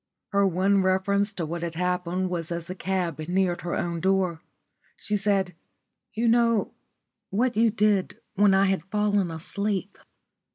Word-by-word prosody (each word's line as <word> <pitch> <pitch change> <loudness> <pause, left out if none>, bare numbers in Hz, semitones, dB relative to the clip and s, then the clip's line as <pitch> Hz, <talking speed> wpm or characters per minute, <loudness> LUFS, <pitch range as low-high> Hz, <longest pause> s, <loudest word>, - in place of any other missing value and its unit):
Her 200 -1 +3
one 190 +2 +2
reference 200 +2 +1
to 175 -4 -3
what 170 +2 -4
had 170 -1 -4
happened 180 +1 -1
was 170 -1 -3
as 170 -1 -3
the 180 - -6
cab 185 -4 -2
neared 175 +2 0
her 175 - -3
own 170 -1 -2
door. 185 -2 +1 0.6
She 210 - -2
said, 195 -2 +1 0.6
"You 230 +2 +1
know 230 -2 +3 0.6
what 240 +5 0
you 225 +1 +4
did 210 -3 +1 0.2
when 205 -1 +4
I 195 +1 +4
had 195 0 0
fallen 205 -2 +1
asleep. 195 +4 -3
190 Hz, 155 wpm, -26 LUFS, 175-205 Hz, 0.6 s, you